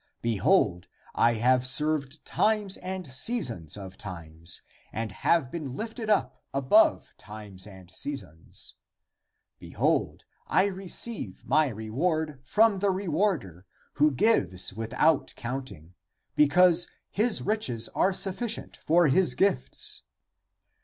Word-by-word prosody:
Behold, 95 -5 +1 0.3
I 120 0 +3
have 125 +3 +2
served 150 0 +1
times 210 -3 0
and 185 0 -6
seasons 125 - 0
of 95 -2 -10
time 85 -4 -10 0.5
and 110 -1 -4
have 135 - +1
been 145 -7 -6
lifted 225 - -5
up 210 - 0
above 135 -1 +3
times 105 -2 -10
and 95 -3 -14
seasons. 95 - -8 0.9
Behold, - - -1 0.2
I 190 - +3
receive 195 - 0
<my 155 -1 +3
re 110 -3 -7
ward 155 +1 -1
> - - -33
from 210 +7 +3
the 200 +1 +1
rewarder, 170 - -2 0.3
who 150 - +6
gives 95 - +2
without 115 +8 0
counting, 120 - -7 0.4
because 175 +3 +5 0.2
his 220 +2 0
riches 135 - -1
are 190 - +1
sufficient 205 +5 -2
for 170 +1 +3
his 180 +6 +3
gifts. 200 +1 0
140 Hz, 115 wpm, -27 LUFS, -, 0.9 s, who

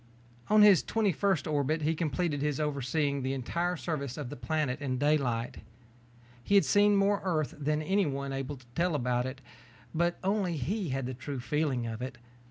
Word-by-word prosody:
On 215 0 +6
his 200 -8 +7
twenty 215 +6 +1
first 190 -4 0
orbit 155 +1 0
he 155 +2 +2
completed 155 -1 -1
his 150 -1 -1
overseeing 140 -1 0
the 130 +1 -1
entire 170 +7 -1
surface 140 -6 -4
of 145 -5 -5
the - - -5
planet 140 +2 -2
in 130 -3 -1
daylight. 130 -5 0 0.9
He 200 - +2
had 200 - +6
seen 205 0 +4
more 200 0 +3
of - - -17
Earth 160 -6 0
than 150 +1 0
anyone 145 -7 0
able 135 +1 -4
to 125 - -18
tell 170 +1 +1
about 125 -2 0
it, 135 +1 -7 0.5
but 170 +1 +1
only 190 -4 0
he 185 - -2
had 135 0 -2
the 130 - -4
true 130 +2 -5
feeling 135 -1 -1
of 115 0 -5
it. 130 0 -5
150 Hz, 185 wpm, -30 LUFS, 130-175 Hz, 0.9 s, his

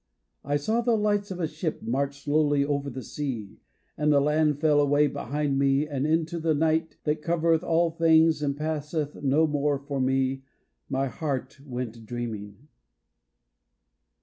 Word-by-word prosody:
I 145 +2 -1
saw 220 +11 0
the 235 -1 +2
lights 205 -1 0
of 185 -2 -5
a 170 - +1
ship 155 +1 -4
march 140 +3 -2
slowly 145 -1 +2
over 140 -1 -1
the 130 0 -7
sea, 125 -9 -5 0.4
And 150 0 +1
the 145 - +5
land 150 0 +2
fell 150 -1 +4
away 145 +1 +3
behind 145 0 -1
me, 140 +2 +2
and 145 -1 -2
into 165 +2 0
the 160 -1 +1
night 160 +2 0
That 150 0 -1
covereth 165 0 +1
all 170 -1 +2
things 160 -1 +4
and 140 -1 -1
passeth 150 -1 -3
no 145 +3 +3
more 145 -1 0
for 140 0 -4
me, 135 0 +1 0.5
My 135 0 0
heart 135 0 -4
went 120 -4 -6
dreaming. 115 0 -6
145 Hz, 155 wpm, -26 LUFS, 135-160 Hz, 0.5 s, the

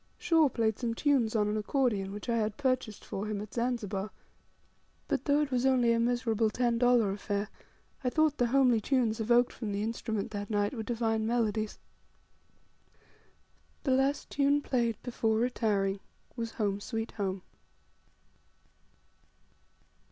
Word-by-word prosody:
Shaw 325 -4 +3
played 220 -3 0
some 230 -2 -2
tunes 250 -5 +2
on 210 -1 +2
an 210 +1 -1
accordion 215 -4 0
which 205 +3 -7
I 235 -1 +1
had 215 -1 -1
purchased 255 -6 -1
for 200 +2 -4
him 210 -1 -2
at 210 0 -8
Zanzibar; 220 -5 -2 1.0
but, - - -1
though 290 +1 +3
it 290 -2 -2
was 250 -1 +1
only 255 -3 +4
a 230 - +1
miserable 230 -2 +1
ten 235 +1 0
dollar 245 -4 +4
affair, 205 +1 -3 0.5
I 250 - +2
thought 310 +1 +2
the 245 - +3
homely 250 -3 +4
tunes 235 -3 +1
evoked 240 +2 +3
from 220 -4 -5
the 200 +1 -2
instrument 220 -1 -3
that 205 -1 -5
night 205 +1 0
were 235 - -4
divine 225 -1 -1
melodies. 220 -2 0 2.1
The 270 - +1
last 270 +2 +1
tune 285 0 +2
played 235 -4 0
before 225 -3 0
retiring 210 -5 0 0.4
was 230 -2 -4
"Home, 205 -2 -1
sweet 225 +2 -4
Home." 195 -3 -3
230 Hz, 145 wpm, -30 LUFS, 210-250 Hz, 2.1 s, only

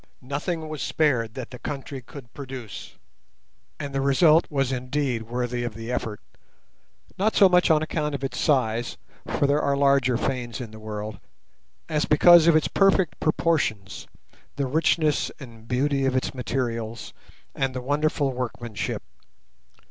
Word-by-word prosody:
Nothing 155 +5 -3
was 155 -1 -6
spared 125 -8 +1
that 130 -2 -6
the 125 - -9
country 140 -1 -6
could 120 -1 -12
produce, 130 -6 -8 0.8
and 145 -2 -5
the 135 - 0
result 150 +4 +4
was 135 -3 0
indeed 125 -2 -2
worthy 120 0 -2
of 120 -3 -4
the 115 +1 -6
effort, 110 -4 -3 1.0
not 215 +3 +2
so 195 - +7
much 180 -1 +4
on 155 -1 +4
account 150 -2 -2
of 140 - -6
its 135 - -3
size—for 120 0 -1
there 145 +2 +2
are 140 0 +1
larger 140 -3 +3
fanes 120 -4 -3
in 120 -4 -7
the 110 - -11
world—as 110 - -6
because 170 +2 +7
of 170 - +6
its 155 - +3
perfect 195 -3 +2
proportions, 135 -12 0 0.5
the 140 - -1
richness 155 +2 +1
and 115 -5 -12
beauty 135 +2 +1
of 130 - 0
its 130 - -1
materials, 115 -3 -3 0.4
and 135 -1 -1
the - - -2
wonderful 145 +1 0
workmanship. 120 -3 -4
135 Hz, 145 wpm, -25 LUFS, 120-150 Hz, 1.0 s, so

